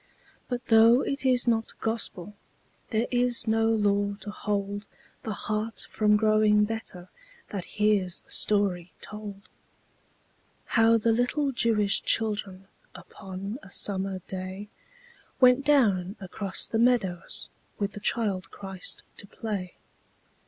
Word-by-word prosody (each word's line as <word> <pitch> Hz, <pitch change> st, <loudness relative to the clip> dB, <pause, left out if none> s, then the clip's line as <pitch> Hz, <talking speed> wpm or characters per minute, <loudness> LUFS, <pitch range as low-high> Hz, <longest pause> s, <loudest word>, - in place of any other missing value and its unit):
But 245 Hz, -1 st, -3 dB
though 230 Hz, +3 st, +7 dB
it 275 Hz, -1 st, -1 dB
is 250 Hz, -1 st, +3 dB
not 225 Hz, -1 st, 0 dB
Gospel, 210 Hz, -4 st, -3 dB, 0.6 s
There 225 Hz, +1 st, +1 dB
is 245 Hz, -1 st, +1 dB
no 225 Hz, 0 st, +2 dB
law 205 Hz, -2 st, +1 dB
to 205 Hz, -, -3 dB
hold 205 Hz, -1 st, -3 dB, 0.3 s
The 220 Hz, -, -4 dB
heart 215 Hz, +2 st, -3 dB
from 210 Hz, -1 st, +3 dB
growing 215 Hz, -1 st, +4 dB
better 210 Hz, -5 st, -6 dB, 0.4 s
That 195 Hz, -4 st, -4 dB
hears 205 Hz, -4 st, +2 dB
the -, -, -17 dB
story 190 Hz, -4 st, +1 dB
told: 205 Hz, -2 st, -8 dB, 1.2 s
How 230 Hz, 0 st, +4 dB
the 230 Hz, +1 st, +2 dB
little 250 Hz, +5 st, +1 dB
Jewish 220 Hz, -5 st, +2 dB
children 205 Hz, -4 st, 0 dB, 0.3 s
Upon 195 Hz, +4 st, -8 dB
a -, -, -14 dB
summer 195 Hz, -1 st, -1 dB
day, 190 Hz, +2 st, -6 dB, 0.7 s
Went 255 Hz, +1 st, +6 dB
down 210 Hz, -10 st, +3 dB
across 195 Hz, 0 st, -3 dB
the 225 Hz, -, -2 dB
meadows 210 Hz, -8 st, +1 dB, 0.3 s
With 200 Hz, -1 st, -1 dB
the 205 Hz, -, -8 dB
Child 200 Hz, -3 st, -1 dB
Christ 190 Hz, -2 st, -6 dB
to 200 Hz, -, -8 dB
play. 200 Hz, -5 st, -5 dB
210 Hz, 125 wpm, -27 LUFS, 195-225 Hz, 1.2 s, though